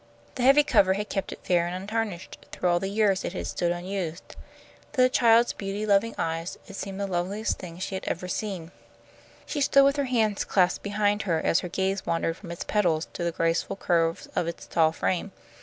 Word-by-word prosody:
The - - -5
heavy 275 +4 +6
cover 190 -9 +4
had 210 +2 -4
kept 195 - -3
it - - -9
fair 175 -1 +2
and 175 - -4
untarnished 200 -1 -4
through 180 - -1
all 175 0 +3
the 195 - -3
years 200 -1 +2
it - - -4
had - - -4
stood 175 -1 -1
unused. 175 -1 -4 0.6
To 265 - +2
the 255 - +5
child's 235 -1 +4
beauty 200 +1 -4
loving 210 +2 +2
eyes 165 +1 -3
it 195 - -10
seemed 195 0 -5
the 200 - -1
loveliest 195 +4 -2
thing 170 -2 -8
she 190 +2 -4
had 190 - -4
ever 180 +2 -3
seen. 180 -4 -4 0.7
She 290 - -3
stood 275 0 +5
with 280 +1 +3
her 285 - +1
hands 220 -5 +1
clasped 185 -2 +2
behind 205 0 0
her 165 -1 +2
as 165 - +2
her 180 - -5
gaze 190 +2 -1
wandered 165 0 -1
from 185 - -11
its 170 - -5
pedals 170 -7 +1
to - - -4
the 170 - 0
graceful 165 +3 0
curves 165 -3 0
of 170 - 0
its 170 - -6
tall 160 -1 +3
frame. 185 +4 -2
190 Hz, 210 wpm, -26 LUFS, 175-210 Hz, 0.7 s, heavy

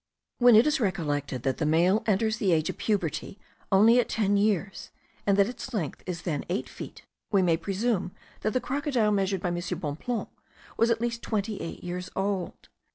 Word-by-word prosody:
When 245 -2 +7
it 220 - +7
is 300 0 +2
recollected 145 - -1
that 135 -1 0
the - - 0
male 175 +7 +3
enters 220 +1 +2
the 200 -4 +1
age 155 -1 +1
of - - -16
puberty 195 -2 -1 0.3
only 220 +5 +6
at 245 - +1
ten 205 -2 +1
years, 200 -2 0 0.4
and 200 -1 +4
that 200 - +6
its 245 +1 -6
length 165 -9 -3
is 175 -2 -4
then 150 -5 -2
eight 185 +4 -1
feet, - - -10 0.3
we 195 -3 +4
may 170 -2 +3
presume 195 +2 -1 0.3
that 215 - -1
the 255 - +2
crocodile 265 -6 0
measured 195 -2 0
by 180 - -1
M. 175 - -2 0.2
Bonpland 170 +9 -3 0.5
was 230 - +3
at 230 -1 +1
least 235 -1 -2
twenty 215 -1 -2
eight 165 - -7
years 180 +1 -5
old. 195 -1 -3
200 Hz, 190 wpm, -27 LUFS, 175-225 Hz, 0.5 s, When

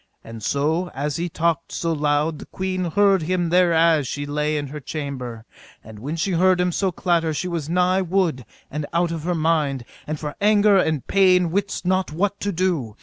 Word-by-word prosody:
And 115 0 -9
so 155 - 0
as 145 +3 -2
he 175 +1 -2
talked 170 0 -1
so 165 -1 -1
loud 150 +1 0
the - - -10
queen 185 -1 -3
heard 195 +2 +3
him 175 +1 0
thereas 165 -4 +3
she 145 +3 -4
lay 150 +1 -1
in 145 - -2
her 150 +2 -6
chamber; 130 -6 -6 0.4
and 110 -1 -12
when 145 +8 -4
she 165 +4 -1
heard 185 +1 +3
him 180 0 +1
so 190 +2 0
clatter 170 -3 0
she 180 - -2
was 165 -4 -3
nigh 180 +2 +2
wood 180 -7 0 0.3
and 150 0 -4
out 170 0 +1
of 165 -2 -4
her 180 0 0
mind, 155 -6 0 0.2
and 155 0 -3
for 150 -1 -5
anger 205 -1 +5
and 155 -6 0
pain 185 -3 +3
wist 200 +1 -2
not 185 -2 +1
what 200 +5 -1
to 205 - -2
do. 165 - -1
165 Hz, 200 wpm, -22 LUFS, 150-185 Hz, 0.4 s, anger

